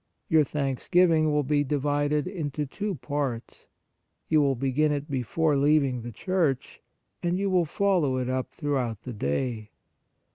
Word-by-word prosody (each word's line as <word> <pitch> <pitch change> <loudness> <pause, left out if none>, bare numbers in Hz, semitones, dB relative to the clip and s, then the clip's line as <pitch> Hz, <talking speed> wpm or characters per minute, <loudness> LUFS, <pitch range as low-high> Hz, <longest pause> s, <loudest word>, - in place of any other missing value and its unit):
Your 160 -1 +5
thanksgiving 155 +4 +2
will 150 0 +2
be 145 +1 +1
divided 145 +1 0
into 150 -5 -3
two 200 +8 -4
parts: 135 -4 -4 0.6
you 155 -1 +4
will 140 -2 +2
begin 135 +4 +1
it 145 0 -3
before 145 +4 +1
leaving 140 -3 +2
the 120 +1 -7
church, 160 - -1 0.4
and 175 +1 0
you 195 0 0
will 180 -2 +3
follow 170 -6 +1
it 125 -1 -2
up 130 0 -2
throughout 125 -7 -2
the 125 - -6
day. 110 - -2
145 Hz, 145 wpm, -27 LUFS, 130-155 Hz, 0.6 s, Your